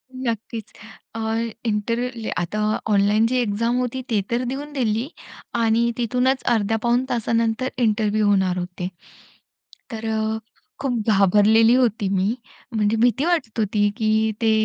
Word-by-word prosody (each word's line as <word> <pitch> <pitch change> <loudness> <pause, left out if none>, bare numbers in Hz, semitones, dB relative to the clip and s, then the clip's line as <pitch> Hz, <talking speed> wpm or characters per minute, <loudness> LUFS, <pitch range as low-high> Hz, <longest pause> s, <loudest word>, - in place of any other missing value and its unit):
नक्कीच. 230 -3 -4 0.4
अ, - - -4 0.5
इंटरव्ह्यू 230 +2 -2
आता 210 +5 -3 0.3
ऑनलाईन 205 +2 +3
जी 255 +1 0
एक्झाम 230 +1 0
होती, 250 +1 -2
ती 210 -3 +2
तर 240 +2 +1
देऊन 280 +4 -5
दिली 235 -2 0 0.5
आणि 230 +1 +2
तिथूनच 250 +3 +1
अर्ध्या-पाऊण 225 +3 +1
तासानंतर 230 +1 0
इंटरव्ह्यू 215 -2 +1
होणार 190 -3 +2
होते. 180 0 -4 1.0
तर 225 -1 -5
अ, 220 0 -1 0.4
खूप 245 -6 -2
घाबरलेली 210 +4 +5
होती 230 -5 +1
मी, 195 +3 +1 0.4
म्हणजे 215 +1 +1
भीती 245 +5 +2
वाटत 330 -11 0
होती 205 0 +2
की 220 -1 +2
ते 225 -1 +3
225 Hz, 125 wpm, -22 LUFS, 210-240 Hz, 1.0 s, घाबरलेली